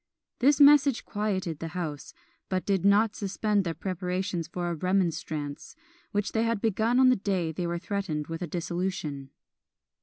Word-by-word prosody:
This 280 +3 +4
message 285 -3 +6
quieted 190 -7 -2
the 165 +2 -6
house, 155 -5 -5 0.3
but 185 -1 -1
did 195 -3 +1
not 205 +2 +4
suspend 205 0 0
their 165 -2 -3
preparations 180 0 -3
for 175 +1 -3
a - - -1
"Remonstrance," 165 -4 -2 0.4
which 205 -1 -1
they 225 - +1
had 230 -1 0
begun 225 +3 +1
on 260 -1 +7
the 255 - +5
day 190 -5 -1
they 170 +2 -3
were 170 0 -2
threatened 180 -5 -3
with 165 +2 -6
a 175 - -2
dissolution. 170 -5 -3
185 Hz, 160 wpm, -28 LUFS, 170-210 Hz, 0.4 s, on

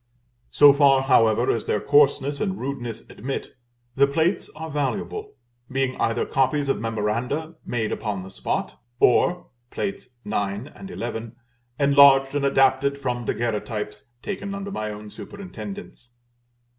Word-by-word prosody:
So 145 -1 +7
far, 140 -2 +5
however, 115 -3 +4
as 115 - -2
their 105 - 0
coarseness 145 +1 +3
and 195 -2 -1
rudeness 125 -4 -5
admit, 135 +5 -5 0.5
the 140 +1 +5
plates 160 +6 0
are 160 0 -6
valuable; 205 - -3 0.4
being 130 -1 0
either 115 +1 +1
copies 140 +1 +1
of - - +1
memoranda 115 +8 -2
made 115 -3 -1
upon 100 -4 -3
the 95 - -10
spot, 95 - -3 0.2
or 175 +8 +3 0.2
(Plates 195 0 -4 0.2
IX. 105 +3 -2
and 195 - -10
XI.) 115 - -5 0.5
enlarged 140 -1 +6
and 145 -1 0
adapted 135 +1 +3
from 125 -3 -2
Daguerreotypes, 105 -2 -3 0.2
taken 200 0 -4
under 200 0 -5
my 110 - -3
own 105 0 -8
superintendence. 200 - -9
135 Hz, 130 wpm, -24 LUFS, 115-150 Hz, 0.5 s, So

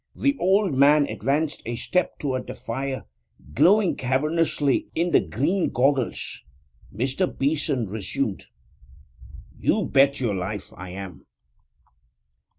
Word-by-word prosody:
The 280 0 +1
old 195 -1 +3
man 145 +2 +5
advanced 145 +6 -1
a 120 +1 -4
step 180 +9 -1
toward 130 -3 -3
the - - -6
fire, 130 +3 -4 0.5
glowing 185 - +4
cavernously 145 +2 0
in 170 +2 +1
the - - +6
green 170 - 0
goggles. 135 0 0 0.5
Mr. 135 - -1
Beeson 140 -3 -1
resumed. 105 +2 -3 1.1
'You - - +1
bet 140 +1 +3
your 120 -5 0
life 95 +2 -5
I 90 0 -8
am!' 90 -4 -9
135 Hz, 115 wpm, -24 LUFS, 115-155 Hz, 1.1 s, the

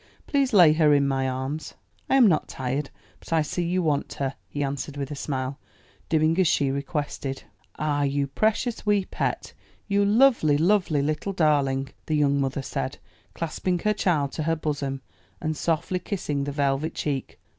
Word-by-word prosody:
Please 275 -2 +1
lay 175 -8 +7
her 155 -2 +4
in 140 -1 +3
my 135 -1 0
arms." 130 +4 -4 0.3
"I - - +4
am 265 -3 +7
not 175 -7 +3
tired, 135 +3 -3 0.3
but - - -15
I 160 -1 +3
see 175 - -3
you 175 +1 0
want 145 -3 0
her," 135 -1 -2
he 145 - -3
answered 140 +1 -4
with 140 0 -4
a - - -3
smile, 135 -1 -3 0.5
doing 160 +2 +2
as 185 - +4
she 140 -3 +2
requested. 140 -1 -3 0.3
"Ah, 145 -1 0
you 140 0 +1
precious 220 - 0
wee 205 -2 +2
pet! - - -3 0.3
you 200 0 +2
lovely, 210 - +4
lovely 170 -4 +2
little 155 +7 -2
darling!" 140 -5 +2 0.2
the 155 - +1
young 140 -1 +2
mother 135 0 -2
said, 65 - -3 0.4
clasping 175 +2 -1
her 210 +5 +1
child 155 -9 +1
to - - -4
her 165 +1 +1
bosom, 140 -3 -3 0.4
and 155 0 -2
softly 165 +3 -1
kissing 150 -8 -3
the 145 - -3
velvet 140 +2 0
cheek. 140 -3 -3
150 Hz, 175 wpm, -25 LUFS, 140-175 Hz, 0.5 s, lay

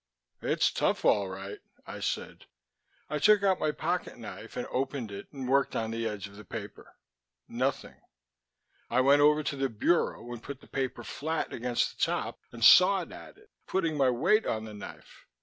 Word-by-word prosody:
"It's - - +2
tough, - - 0
all 100 -2 +3
right," 95 +1 -7 0.3
I - - -7
said. - - -4 0.6
I 150 - -2
took 210 +4 +5
out 190 -2 +3
my 155 - +1
pocket - - -2
knife - - -9
and - - -2
opened 130 -4 -2
it 100 - -8
and 135 -3 -6
worked 140 +2 +2
on 110 0 -1
the 115 0 -2
edge 105 -2 -5
of 100 0 -15
the 105 - -10
paper. 95 - -9 0.5
Nothing. - - -2 0.9
I 125 +2 +3
went 140 +2 +5
over 150 +1 +5
to 145 - -2
the 135 -1 0
bureau 120 0 0
and 120 - -8
put 140 +2 -8
the - - -18
paper 135 -1 -3
flat 160 +2 -3
against 120 0 -1
the - - +1
top - - -1
and 115 -1 -6
sawed 185 - +7
at - - -11
it, 425 0 -22 0.2
putting 165 -5 0
my 135 -3 +3
weight 170 - +2
on 110 0 -1
the 110 - -9
knife. 105 -1 -11
135 Hz, 185 wpm, -29 LUFS, 115-155 Hz, 0.9 s, sawed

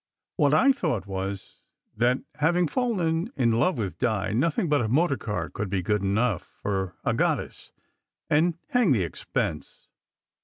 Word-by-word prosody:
What 145 -1 +3 0.2
/ - - -19
thought 145 - -1
was, 95 0 -5 0.3
that 120 +3 +2 0.2
having 175 +3 +3
fallen 175 - 0
in 120 -3 +2
love 120 +11 +2
with 100 -5 -4
Di, 110 -2 0
nothing 165 - +1
but 145 -3 +2
a 115 - 0
motor 140 +5 +2
car 105 -9 -3
could 105 -1 -5
be 95 -1 -1
good 105 +2 +1
enough 100 +1 +1 0.2
for 95 -3 -2
a - - +1
goddess, - - -1 0.6
and 160 +3 +2
hang 245 - +3
the 105 -7 +1
expense! 80 -1 -4
120 Hz, 155 wpm, -26 LUFS, 100-160 Hz, 0.6 s, What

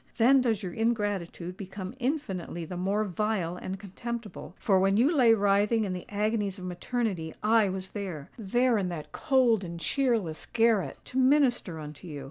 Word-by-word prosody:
Then 260 +3 +6
does 225 -4 0
your 180 -2 -4
ingratitude 205 -6 -1
become 190 0 -7
infinitely 200 - -3
the 180 - -7
more 195 +4 0
vile 195 -3 -1
and 185 +1 -5
contemptible. 225 +3 -7
For 195 -3 +3
when 195 +1 +3
you 280 +9 +4
lay 235 -5 +6
writhing 205 +2 +2
in 190 - -2
the 180 - -6
agonies 210 -1 -1
of 185 - -8
maternity, 180 -2 -3
I 215 -1 +4
was 190 0 -5
there,—there 205 - -1
in 185 -2 -1
that 165 -4 -6
cold 245 -6 +2
and 170 -1 -6
cheerless 215 - 0
garret,—to 230 +2 +1
minister 255 - +3
unto 150 +3 -9
you! 150 -3 -6
205 Hz, 160 wpm, -28 LUFS, 180-230 Hz, -, Then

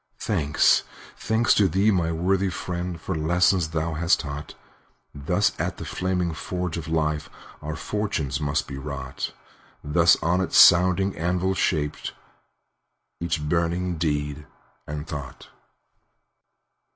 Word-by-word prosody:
Thanks, 75 0 +2 0.3
thanks 110 +2 +2
to 100 - +4
thee, 95 +5 +2
my 85 -4 +1
worthy 95 +4 +1
friend, 90 0 -4
For 95 - -4
the 80 - -3
lesson 90 +3 +3
thou 80 +1 -2
hast 85 +3 +2
taught! 70 0 -7 0.6
Thus 90 +8 +1
at - - -2
the - - -7
flaming 90 -2 -1
forge 90 +1 -4
of 85 -2 -5
life 75 -2 -1 0.3
Our 75 +1 -5
fortunes 80 -6 -2
must 75 +1 -1
be 70 - -6
wrought; 70 -2 -5 0.5
Thus 85 +4 +4
on 85 +3 +2
its 95 - 0
sounding 95 +2 +6
anvil 90 +3 0
shaped 75 -6 -1 1.1
Each 80 -3 -2
burning 85 +1 0
deed 75 -2 -2 0.4
and 75 0 -5
thought. 75 -4 -8
85 Hz, 125 wpm, -24 LUFS, 75-90 Hz, 1.1 s, sounding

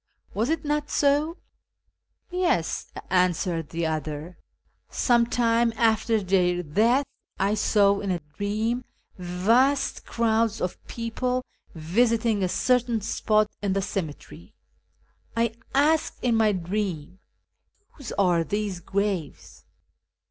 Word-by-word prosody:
Was 225 +6 0
it 320 -1 -1
not 295 0 -1
so? 295 +4 +2 0.3
" - - -51
" - - -45
Yes," 355 - 0 0.2
answered 180 -3 +1
the 170 0 -2
other, 155 +2 -4 0.3
" - - -42 0.2
some 235 -2 +2
time 235 -1 +2
after 225 -1 +2
tlieir 180 -5 0
death 240 - +3 0.3
I 200 +2 +1
saw 200 -1 +3
in 200 - -4
a 180 - +1
dream 210 +10 -2 0.4
vast 225 +11 +2
crowds 225 -1 +1
of 180 - -4
people 250 +2 -2 0.3
visiting 220 +6 +1
a 185 - +1
certain 245 +1 +1
spot 215 0 +1
in 200 -2 0
the 195 - 0
cemetery. 165 -7 -6 0.8
I 230 -1 +1 0.2
asked 305 +3 +2
in 245 -2 +2
my 220 -2 +3
dream, 185 -2 -3 0.4
' 410 - -45
Whose 280 -6 -9
are 175 -4 +2
these 205 0 -3
graves 190 -4 -3
215 Hz, 125 wpm, -25 LUFS, 180-240 Hz, 0.8 s, death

